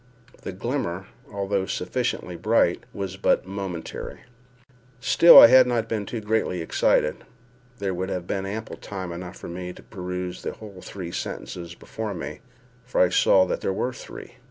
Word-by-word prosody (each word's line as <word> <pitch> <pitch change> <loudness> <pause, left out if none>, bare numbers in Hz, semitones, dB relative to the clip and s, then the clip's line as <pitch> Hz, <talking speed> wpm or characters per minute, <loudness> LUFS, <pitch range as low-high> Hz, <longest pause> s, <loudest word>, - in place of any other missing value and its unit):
The - - -5
glimmer, 95 -3 -3 0.3
although 100 -1 -1
sufficiently 90 - -2
bright, 95 0 +2
was 95 -2 -5
but 95 - +2
momentary. 95 -3 -6 0.8
Still, 150 +6 +9
had 130 +2 +8
I - - -1
not 115 -2 0
been 110 -2 -3
too 115 - -4
greatly 105 -4 0
excited, 80 -2 +2 0.6
there 100 -3 -2
would 95 +1 -3
have 90 -2 -3
been 95 +1 -3
ample 110 +3 -5
time 95 -3 -6
enough 90 +1 -7
for - - -9
me 90 +1 -6
to - - -15
peruse 90 -2 -5
the - - -4
whole 100 -4 -11
three 90 -3 -7
sentences 85 0 -6
before 110 +1 -6
me—for 125 - -7
I 90 - +5
saw 95 +1 +5
there 95 - -2
were 125 +6 -2
three. - - -11
95 Hz, 155 wpm, -25 LUFS, 90-110 Hz, 0.8 s, Still